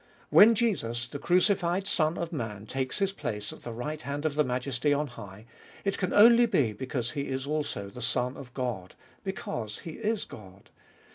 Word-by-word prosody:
When 225 Hz, +3 st, +8 dB
Jesus, 120 Hz, -, 0 dB
the 145 Hz, -, -6 dB
crucified 180 Hz, +1 st, +2 dB
Son 160 Hz, -4 st, +1 dB
of 170 Hz, 0 st, -4 dB
Man, 110 Hz, -7 st, -4 dB
takes 130 Hz, +3 st, -2 dB
His 195 Hz, -1 st, +1 dB
place 105 Hz, -, -4 dB
at -, -, -13 dB
the 120 Hz, -, -6 dB
right 150 Hz, +7 st, -4 dB
hand 145 Hz, +1 st, -4 dB
of 155 Hz, -, +1 dB
the 150 Hz, +1 st, +3 dB
Majesty 130 Hz, +2 st, 0 dB
on 150 Hz, +1 st, 0 dB
high, 105 Hz, -5 st, -10 dB, 0.4 s
it 195 Hz, -, 0 dB
can 185 Hz, -, 0 dB
only 235 Hz, +3 st, +7 dB
be 145 Hz, -, +2 dB
because 120 Hz, +1 st, -3 dB
He 140 Hz, +2 st, -3 dB
is 130 Hz, 0 st, -2 dB
also 145 Hz, -9 st, -2 dB
the 110 Hz, +5 st, -10 dB
Son 125 Hz, +2 st, 0 dB
of 130 Hz, -3 st, -10 dB
God, 120 Hz, -9 st, -3 dB, 0.3 s
because 120 Hz, -, -4 dB
He 165 Hz, -, -4 dB
is 220 Hz, -1 st, -1 dB
God. 100 Hz, -2 st, -13 dB
140 Hz, 190 wpm, -29 LUFS, 120-175 Hz, 0.4 s, When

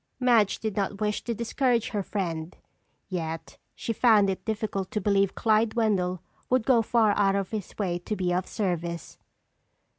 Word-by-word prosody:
Madge 235 Hz, -6 st, +4 dB
did 220 Hz, -3 st, -3 dB
not 200 Hz, -1 st, -2 dB
wish 210 Hz, -1 st, -1 dB
to 235 Hz, -, -2 dB
discourage 235 Hz, +1 st, 0 dB
her 210 Hz, -3 st, -1 dB
friend 175 Hz, -4 st, -4 dB, 0.5 s
yet 165 Hz, -3 st, -5 dB, 0.2 s
she 230 Hz, -, -3 dB
found 215 Hz, -4 st, +4 dB
it 190 Hz, -, -6 dB
difficult 210 Hz, -3 st, -2 dB
to 210 Hz, -, -2 dB
believe 200 Hz, -1 st, +2 dB
Clyde 220 Hz, 0 st, +2 dB
Wendell 185 Hz, -6 st, +1 dB, 0.3 s
would 255 Hz, -3 st, +2 dB
go 245 Hz, -4 st, +5 dB
far 225 Hz, -1 st, +3 dB
out 195 Hz, -1 st, +3 dB
of 195 Hz, -2 st, -2 dB
his 215 Hz, -4 st, -5 dB
way 180 Hz, -4 st, -1 dB
to 210 Hz, +5 st, -4 dB
be 180 Hz, -2 st, 0 dB
of 180 Hz, +1 st, -1 dB
service. 170 Hz, -5 st, -3 dB
205 Hz, 170 wpm, -27 LUFS, 185-220 Hz, 0.5 s, go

